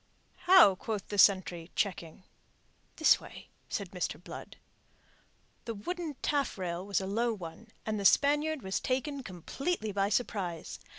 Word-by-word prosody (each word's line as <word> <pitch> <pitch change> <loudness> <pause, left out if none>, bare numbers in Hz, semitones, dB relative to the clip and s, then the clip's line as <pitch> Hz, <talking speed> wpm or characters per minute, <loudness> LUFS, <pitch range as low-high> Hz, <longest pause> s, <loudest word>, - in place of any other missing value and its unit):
"How?" 360 - +8
quoth 205 +1 -5
the 205 - -2
sentry, 180 -4 +4
checking. 180 -3 -2 0.7
"This - - +5
way," - - -12 0.2
said - - -4
Mr. - - -3
Blood. - - -10 1.1
The 230 - -4
wooden 325 - -4
taffrail 185 -12 -1
was 200 0 0
a - - -4
low 225 +4 0
one, 175 +3 -9 0.2
and 215 -1 -2
the 200 - -4
Spaniard 295 +4 +3
was 190 0 -1
taken 270 +2 -2
completely 220 - -3
by 200 0 +1
surprise. 195 -8 -2
205 Hz, 135 wpm, -31 LUFS, 190-275 Hz, 1.1 s, How